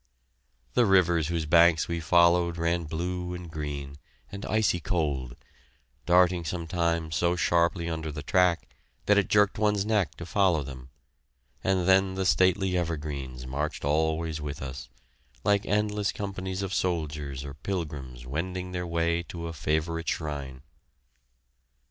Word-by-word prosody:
The 120 -3 +4
rivers 85 -5 +4
whose 85 -2 -1
banks 85 +1 +5
we 85 -1 -2
followed 85 +1 +3
ran 85 0 0
blue 90 +3 -3
and 90 -2 -8
green, 70 -2 -5 0.3
and 100 +1 -6
icy 110 -5 +2
cold, 75 -9 -2 0.7
darting 90 0 +4
sometimes 85 -1 -1
so 85 +3 +2
sharply 85 0 +1
under 80 -1 -3
the 75 0 -6
track 90 +1 +2 0.4
that 105 0 +5
it 100 - 0
jerked 105 -1 +3
one's 105 -2 +2
neck 105 -5 +1
to 85 - -8
follow 90 -4 +2
them; 65 -1 -9 0.7
and 95 -2 +1
then 95 0 +4
the 95 0 -1
stately 95 0 +3
evergreens 75 -7 -3
marched 75 +3 -3
always 80 +1 0
with 70 -1 -5
us, 65 -2 -7 0.5
like 100 -1 +2
endless 105 0 +1
companies 95 -1 -4
of 95 -1 -3
soldiers 75 -6 -2
or 70 - -7
pilgrims 70 -7 -5
wending 90 +7 -4
their 90 -1 -3
way 85 0 +1
to 85 0 -7
a 85 - -5
favorite 80 +2 -1
shrine. 70 -4 -4
85 Hz, 140 wpm, -27 LUFS, 75-90 Hz, 0.7 s, banks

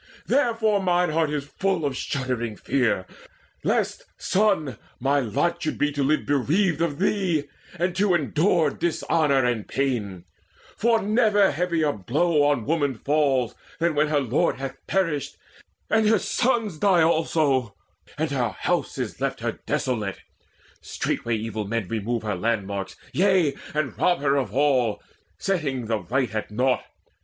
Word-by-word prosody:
Therefore 225 -6 +2
mine 180 -2 +2
heart 160 0 +1
is 145 -2 -2
full 185 +1 -1
of 140 -2 -1
shuddering 125 -5 -2
fear 120 -9 0 0.6
Lest, - - 0
son, 185 - +1 0.2
my 140 +3 +2
lot 170 +9 0
should 155 - -2
be 145 0 +1
to 145 0 -2
live 150 +3 +1
bereaved 155 +5 +1
Of 160 -4 0
thee, 185 -5 +1 0.3
and 175 +1 -1
to 195 -2 +3
endure 155 0 +2
dishonour 155 -5 +1
and 120 -4 -1
pain, 110 -10 -2 0.5
For 230 +1 +2
never 210 -2 +3
heavier 160 -1 0
blow 145 - +1
on 145 -6 +1
woman 145 -4 0
falls 135 -2 +1 0.2
Than 170 0 +1
when 150 +1 +2
her 150 -1 +2
lord 140 +6 +1
hath 135 0 -5
perished, 165 -7 -1 0.5
and 220 -1 +3
her 220 - +5
sons 225 -9 0
Die 185 -3 +4
also, 150 -8 +1 0.4
and - - -1
her - - 0
house - - -1
is - - -4
left - - -1
to - - -12
her - - -17
Desolate. 110 -7 -1 0.6
Straightway 115 -1 -2
evil 110 -1 -4
men 115 -2 -2
remove 115 +3 -2
Her 105 -1 -1
landmarks, 100 -1 -2 0.2
yea, 185 -5 +3 0.2
and 150 -4 -1
rob 175 -5 +2
her 140 -1 +2
of 135 -6 0
her 105 - -12
all, 130 -7 +2 0.3
Setting 145 -10 -1
the 110 -1 -1
right 120 +4 -1
at 110 -1 -3
naught. 125 +4 +1
145 Hz, 150 wpm, -24 LUFS, 120-175 Hz, 0.6 s, her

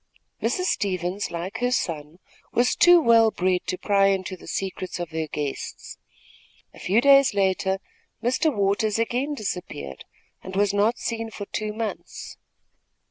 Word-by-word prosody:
Mrs. 365 - 0
Stevens, 190 - -1
like 180 +6 -5
her 245 +1 +1
son, 160 -9 -2 0.3
was 245 +1 +2
too 350 0 +7
well 230 -6 +5
bred 185 -3 0
to 185 - -1
pry 195 0 +3
into 190 -1 -1
the 180 - -15
secrets 190 -1 -4
of 175 -2 -5
her 160 0 -2
guests. 145 -2 -5 0.7
A - - -14
few 205 +6 +2
days 275 -3 +6
later 190 -1 +1 0.5
Mr. 260 +6 +2
Waters 205 -1 +1
again 250 +6 -1
disappeared 180 - -5 0.4
and 190 0 -8
was 200 0 +2
not 210 +4 +2
seen 225 -1 -3
for 205 -2 -7
two 215 +1 -3
months. 220 0 -6
200 Hz, 145 wpm, -24 LUFS, 185-230 Hz, 0.7 s, too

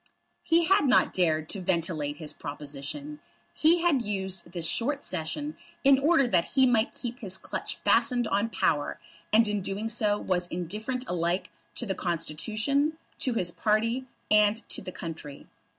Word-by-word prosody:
He 335 0 +3
had 385 -4 +4
not 255 - +4
dared 160 -4 +1
to 195 - -3
ventilate 165 -5 -1
his 155 -2 -4
proposition. 150 - -6 0.3
He 335 +2 +4
had 310 -7 +3
used 190 -5 -4
this 170 -2 -2
short 275 +10 0
Session 290 - -2 0.3
in 270 -1 +6
order 290 -1 +4
that 180 -7 +2
he 265 -1 +6
might 235 -3 +2
keep 240 +1 -6
his 190 -6 -2
clutch - - -5
fastened 245 -3 +2
on 205 +3 +1
power, 150 -9 0 0.3
and 225 +1 +5
in 210 -1 -1
doing 200 +4 -2
so 210 -3 +2
was 180 -3 -1
indifferent 210 +9 -3
alike 175 +1 -1 0.2
to 240 - -2
the 195 - -1
Constitution, 215 - -1 0.2
to 255 - +1
his 175 -5 +1
party, 230 +7 0 0.2
and 210 +1 +4
to - - -2
the 185 - -7
country. 155 -5 -8
210 Hz, 160 wpm, -28 LUFS, 170-255 Hz, 0.3 s, in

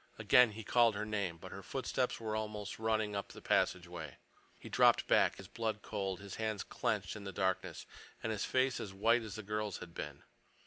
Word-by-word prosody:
Again 125 -3 +6
he 110 +1 -7
called 115 0 +4
her 105 +1 -2
name, 100 -6 -2
but - - -10
her - - -7
footsteps - - -1
were 110 -1 -2
almost 105 -1 -4
running 110 -2 +1
up 100 - -2
the - - -11
passageway. 85 -4 0 0.4
He - - -11
dropped - - +5
back, - - +4
his 95 - -10
blood 110 0 -3
cold, 95 -3 -3
his 100 -2 -7
hands 110 -3 -1
clenched - - -1
in 105 - -7
the 100 - -5
darkness, 95 0 -1 0.4
and 115 - 0
his 105 -3 -1
face 130 0 +2
as 95 -2 -6
white 115 +4 +4
as 110 -3 -6
the 110 - -6
girl's 105 +1 -2
had 85 - -10
been. - - -6
105 Hz, 200 wpm, -35 LUFS, 95-110 Hz, 0.4 s, Again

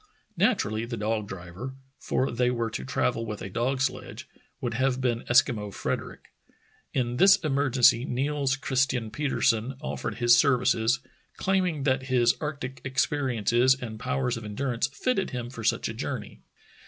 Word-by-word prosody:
Naturally 110 - +1
the 115 0 -5
dog 110 0 -1
driver 95 +8 -7
— 135 - -41
for 130 - +1
they 125 +1 +1
were 115 -2 -1
to 65 - -4
travel 115 - 0
with 105 -2 -5
a 95 - -6
dog 130 +5 -1
sledge 135 - -3 0.2
— - - -39
would - - -3
have 130 +1 +1
been 120 -3 0
Eskimo 120 -4 +3
Frederick. - - -4 0.6
In 125 -2 -1
this 195 +4 +7
emergency 135 -5 +4
Niels 135 +1 0
Christian 130 -4 0
Petersen 130 -3 0
off"ered 150 - -4
his 120 -1 +5
ser 130 +1 +4
vices, 120 0 +1 0.4
claiming 185 -6 0
that 130 -1 +1
his 120 -2 +4
arctic 140 -4 -5
experiences 130 -2 +2
and 110 -3 -6
powers 125 0 -1
of 115 - -8
endurance 120 +3 -1
fitted 195 - -1
him 120 -1 -5
for 115 -3 -8
such - - +1
a - - -4
journey. - - -5
125 Hz, 160 wpm, -27 LUFS, 115-135 Hz, 0.6 s, this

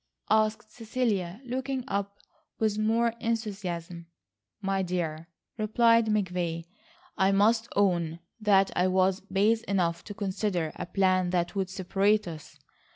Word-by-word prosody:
asked 215 +1 +2
Cecilia, 220 -6 -2
looking 260 +1 -3
up 200 -3 -3 0.4
with 215 -1 0
more 225 +2 +2
enthusiasm. 190 -7 -3 0.5
"My 195 -1 0
dear," 170 -3 -3 0.3
replied 230 +1 +4
McVay, 180 -5 -1 0.5
"I 190 0 +4
must 220 +4 +3
own 175 -5 +1 0.2
that 195 -3 +4
I 180 - +3
was 185 0 +2
base 205 +3 +1
enough 175 -4 0
to 205 - -8
consider 190 -5 -1
a - - -5
plan 185 -1 +2
that 175 -1 0
would 190 -2 -1
separate 195 +2 +1
us. 160 -3 -9
195 Hz, 125 wpm, -28 LUFS, 180-215 Hz, 0.5 s, replied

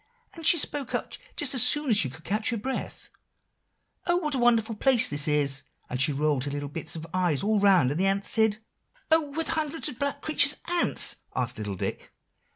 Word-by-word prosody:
And 330 -1 -4
she 340 - +5
spoke 285 -3 -2
up - - -4 0.2
just 285 -2 +1
as 255 - +3
soon 280 +2 +4
as - - +4
she 145 -10 +3
could 160 +6 -14
catch 215 +5 -1
her 230 - -1
breath, 265 +5 -6 1.0
'Oh, 345 0 +3
what 305 -5 -2
a 265 - 0
wonderful 230 -2 +3
place 245 - +3
is 145 0 +3
this!' 140 -2 +1 0.3
and 125 +1 -2
she 150 +3 +2
rolled 145 -1 0
her - - -3
little 145 0 -5
bits 160 +3 -5
of 160 0 -7
eyes 180 -5 0
all 210 0 +1
around; 185 -10 +4
and 150 - -3
the 190 - +2
ants 195 +1 -1
said" 220 -1 +2 0.5
"Oh! 320 -2 +3
were 325 +2 0
the - - -3
hundreds 315 0 -1
of 250 - -10
black 280 0 -2
creatures 295 -2 +3
ants?" 350 0 +1 0.2
asked 125 -2 -1
little 105 -2 -4
Dick. - - -5
215 Hz, 215 wpm, -26 LUFS, -, 1.0 s, she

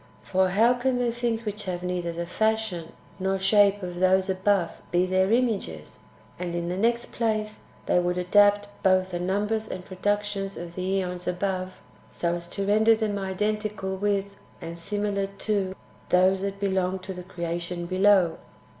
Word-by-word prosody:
For 190 0 +2
how 225 +6 +4
can 250 +1 0
the 245 -1 +1
things 230 -1 -2
which 210 0 -4
have 180 -1 -3
neither 180 -1 -2
the 170 +1 -4
fashion 220 -3 -1 0.3
nor 190 +1 0
shape 205 0 +4
of 175 -1 -5
those 190 +1 +3
[above] 190 -2 +1 0.2
be 175 +1 +3
their 185 +1 +2
images? 215 - -1 0.4
And, 175 -1 -3
in 170 0 -2
the 180 - -2
next 235 +4 0
place, 215 -2 -2 0.2
they - - +3
would 180 0 0
adapt 205 +3 +4
both 185 0 +3
the 175 - -2
numbers 210 +4 -1
and 185 0 -6
pro 185 - -10
ductions 205 -1 -1
of 170 0 -7
the 190 +2 0
zEons 180 0 -5
above, 185 0 -2 0.4
so 170 0 -1
as 175 0 -5
to 200 +2 -3
render 220 +2 +5
them 215 -2 -1
identical 210 0 -2
with 200 0 -1 0.3
and 170 -1 -6
similar 205 +1 -1
to 195 -1 -2 0.3
those 185 +1 +4
that 200 0 -3
belong 190 -2 0
to 190 +1 -7
the 180 - -7
creation 175 -1 -4
[below]. 185 -2 +4
190 Hz, 170 wpm, -26 LUFS, 180-205 Hz, 0.4 s, render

